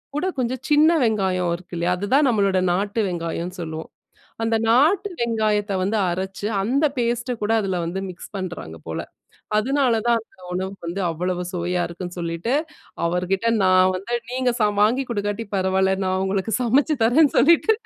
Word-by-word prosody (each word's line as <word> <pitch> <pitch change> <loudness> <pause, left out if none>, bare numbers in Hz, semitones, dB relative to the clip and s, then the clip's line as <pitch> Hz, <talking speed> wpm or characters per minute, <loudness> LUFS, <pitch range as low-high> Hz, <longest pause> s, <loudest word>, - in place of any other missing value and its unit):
கூட 300 - -1
கொஞ்சம் 255 0 -2
சின்ன 305 +2 +5
வெங்காயம் 190 -6 +1
இருக்கு 175 +1 -14
இல்லயா! 175 +1 +1
அதுதான் 260 +10 +2
நம்மளோட 200 -5 +2
நாட்டு 200 +4 -1
வெங்காயம்ன்னு 170 0 -4
சொல்லுவோம். 160 -1 -6 0.5
அந்த 225 0 +1
நாட்டு 315 - +4
வெங்காயத்த 215 -3 0
வந்து 200 +4 0
அரச்சு, 190 +3 -4 0.2
அந்த 265 +9 +1
பேஸ்ட் 240 +1 -1
அ - - -1
கூட 210 +2 +1
அதுல 190 -3 -1
வந்து 170 +3 -3
மிக்ஸ் 180 - -11
பண்றாங்க 175 - -6
போல. 80 - -3 0.6
அதனால 260 +3 +2
தான் 235 -1 +4
அந்த 205 -4 -21
உணவு 190 +1 -2
வந்து 170 +4 -3
அவ்வளவு 180 +2 -2
சுவையா 175 0 -1
இருக்குன்னு 175 +1 -7
சொல்லிட்டு, 170 +8 -2 0.5
அவர்க்கிட்ட 180 +5 0 0.2
நான் 185 0 +5
வந்து 200 +6 -4 0.2
நீங்க 255 0 +1
சா 210 - +5 0.2
வாங்கிக் 245 +5 +2
கொடுக்காட்டி 205 0 -2
பரவால்ல. 190 0 +2
நான் 185 0 0
உங்களுக்கு 195 +3 -1
சமைச்சு 270 +6 +2
தரேன்னு 270 +5 +4
சொல்லிட்டு 335 - +5
200 Hz, 160 wpm, -22 LUFS, 180-240 Hz, 0.6 s, சின்ன